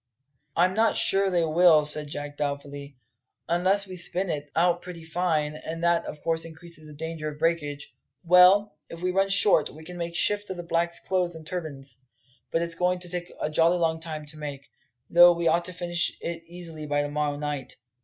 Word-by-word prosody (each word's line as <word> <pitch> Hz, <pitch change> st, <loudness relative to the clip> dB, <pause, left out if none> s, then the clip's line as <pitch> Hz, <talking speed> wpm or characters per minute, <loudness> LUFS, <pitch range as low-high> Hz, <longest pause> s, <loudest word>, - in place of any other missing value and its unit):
"I'm 180 Hz, +2 st, +3 dB
not 220 Hz, +2 st, +2 dB
sure 195 Hz, 0 st, +3 dB
they 175 Hz, -3 st, +1 dB
will," 160 Hz, -1 st, +5 dB
said 150 Hz, 0 st, +2 dB
Jack 145 Hz, 0 st, -6 dB
doubtfully, 140 Hz, -1 st, -5 dB, 0.5 s
"unless 185 Hz, +4 st, +2 dB
we 185 Hz, -1 st, -9 dB
spin 180 Hz, +1 st, -2 dB
it, 145 Hz, -1 st, -4 dB
out 175 Hz, +1 st, +2 dB
pretty 175 Hz, -2 st, -9 dB
fine; 160 Hz, -2 st, -1 dB
and 165 Hz, +2 st, -6 dB
that, 170 Hz, 0 st, +2 dB
of 150 Hz, -, -8 dB
course, 165 Hz, -1 st, 0 dB
increases 165 Hz, -1 st, -10 dB
the 150 Hz, -, -11 dB
danger 160 Hz, 0 st, -4 dB
of 150 Hz, -, -9 dB
breakage. 150 Hz, -3 st, -2 dB, 0.3 s
Well, 180 Hz, +4 st, +6 dB, 0.2 s
if 165 Hz, +1 st, -9 dB
we 185 Hz, -, +1 dB
run 195 Hz, +1 st, +1 dB
short, 200 Hz, -5 st, +4 dB
we 155 Hz, +2 st, -13 dB
can 175 Hz, +2 st, -9 dB
make 170 Hz, 0 st, -4 dB
shift 205 Hz, +4 st, +2 dB
with 190 Hz, -, -5 dB
the 175 Hz, -, -5 dB
blacks' 170 Hz, 0 st, 0 dB
clothes 180 Hz, -2 st, -1 dB
and 160 Hz, -1 st, -10 dB
turbans. 140 Hz, -7 st, -6 dB, 0.5 s
But 165 Hz, -, 0 dB
it's 170 Hz, 0 st, -2 dB
going 180 Hz, +2 st, +1 dB
to 180 Hz, 0 st, -6 dB
take 175 Hz, 0 st, -5 dB
a 150 Hz, -, -2 dB
jolly 165 Hz, +3 st, +3 dB
long 165 Hz, -1 st, 0 dB
time 155 Hz, -2 st, -6 dB
to 150 Hz, +1 st, -9 dB
make 140 Hz, -2 st, -7 dB, 0.4 s
though 175 Hz, 0 st, +7 dB
we 170 Hz, 0 st, -1 dB
ought 170 Hz, +2 st, +2 dB
to 185 Hz, -, -5 dB
finish 175 Hz, -1 st, -2 dB
it 165 Hz, 0 st, -5 dB
easily 165 Hz, -3 st, -8 dB
by 145 Hz, 0 st, +1 dB
to 145 Hz, -, -4 dB
morrow 145 Hz, -1 st, -1 dB
night. 145 Hz, -3 st, -4 dB
165 Hz, 205 wpm, -26 LUFS, 150-175 Hz, 0.5 s, though